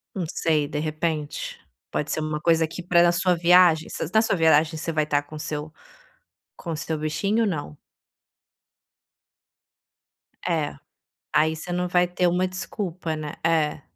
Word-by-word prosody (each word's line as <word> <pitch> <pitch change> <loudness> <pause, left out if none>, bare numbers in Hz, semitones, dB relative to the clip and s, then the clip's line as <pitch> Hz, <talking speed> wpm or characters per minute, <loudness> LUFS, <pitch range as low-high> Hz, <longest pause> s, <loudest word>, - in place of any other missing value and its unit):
Não 185 - -2
sei 155 -3 +1
de 150 +1 -4
repente, 155 -1 -3 0.3
pode 150 - -2
ser 155 - -1
uma 155 0 -2
coisa 165 0 +3
que 165 +3 -7
para 175 -1 +4
a - - +4
sua 180 0 +2
viagem, 170 -1 +5
vocês 160 - -4
na 220 - +6
sua 195 -4 0
viagem 160 0 +4
você 165 +1 -3
vai 155 0 +2
estar 145 -1 0
com 155 +1 -10
seu 150 +1 -5 0.8
com 165 -3 -5
seu 160 0 -3
bichinho 195 +9 0
ou - - +1
não? 145 - -5 2.7
É, - - -1 0.6
aí 160 +1 +3
você 175 +3 -6
não 180 0 -1
vai 180 0 +3
ter 180 0 0
uma 180 +2 +2
desculpa, 180 -3 -4
né. 150 -1 -5
É. 155 -3 +1
160 Hz, 160 wpm, -24 LUFS, 155-180 Hz, 2.7 s, na